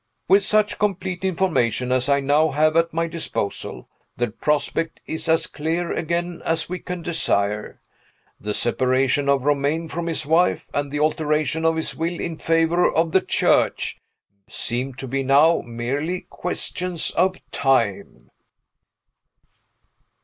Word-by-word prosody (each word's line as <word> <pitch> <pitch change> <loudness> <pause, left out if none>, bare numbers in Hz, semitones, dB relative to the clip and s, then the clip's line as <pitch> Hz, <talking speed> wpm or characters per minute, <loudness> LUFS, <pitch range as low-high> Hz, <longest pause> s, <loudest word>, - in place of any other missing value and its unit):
With 195 +2 +5
such 210 0 +2
complete 190 -2 -1
information 160 - 0
as 130 +1 +1
I 140 0 +3
now 145 +3 +3
have 155 +2 +2
at 165 0 +3
my 165 +1 0
disposal, 160 -11 -4 0.3
the 120 0 -1
prospect 150 +2 -1
is 160 0 -4
as 160 0 +3
clear 165 +3 -2
again 170 +1 -2
as 165 0 0
we 180 +1 -4
can 180 -1 -6
desire. 105 -11 -1 0.6
The 105 0 -3
separation 130 +3 +1
of 140 -2 +2
Romayne 145 +3 0
from 170 +1 -4
his 160 -2 -1
wife, 165 +4 +2
and 145 0 -1
the 145 - -2
alteration 155 +1 0
of 165 0 +3
his 160 - -3
will 170 +1 -2
in 165 -2 -4
favor 165 +2 +2
of 165 0 +1
the 190 - +4
Church, - - +1 0.5
seem 125 +2 -2
to 135 0 -7
be 135 +2 -1
now 145 +5 +4
merely 135 +10 -3
questions 180 -1 -2
of 185 +2 +2 0.2
time. 130 -8 0
160 Hz, 140 wpm, -22 LUFS, 135-170 Hz, 0.6 s, With